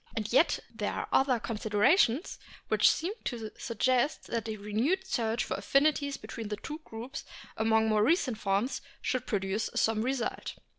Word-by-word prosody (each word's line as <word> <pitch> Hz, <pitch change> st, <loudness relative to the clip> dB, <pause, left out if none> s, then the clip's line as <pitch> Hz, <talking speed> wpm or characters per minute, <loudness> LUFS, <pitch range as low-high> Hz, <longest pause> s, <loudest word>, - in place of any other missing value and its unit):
And 215 Hz, 0 st, -3 dB
yet 310 Hz, +7 st, +5 dB, 0.2 s
there -, -, -2 dB
are -, -, -3 dB
other 265 Hz, -3 st, +3 dB
considerations 230 Hz, -, +2 dB, 0.3 s
which -, -, +5 dB
seem 350 Hz, +6 st, 0 dB
to 225 Hz, -4 st, -4 dB
suggest 255 Hz, +3 st, +1 dB
that 230 Hz, -1 st, -2 dB
a 215 Hz, -, -3 dB
renewed 230 Hz, -, 0 dB
search 235 Hz, -8 st, 0 dB
for -, -, -3 dB
affinities 280 Hz, +6 st, +2 dB
between 225 Hz, -3 st, -7 dB
the 210 Hz, 0 st, -3 dB
two 300 Hz, +8 st, -6 dB
groups 230 Hz, +2 st, -7 dB, 0.3 s
among 220 Hz, 0 st, +3 dB
more 215 Hz, -1 st, +3 dB
recent 260 Hz, -, +2 dB
forms 200 Hz, +6 st, 0 dB, 0.2 s
should 255 Hz, -, -2 dB
produce 205 Hz, 0 st, -1 dB
some 220 Hz, -1 st, +2 dB
result. 250 Hz, 0 st, -2 dB
230 Hz, 155 wpm, -30 LUFS, 215-270 Hz, 0.3 s, yet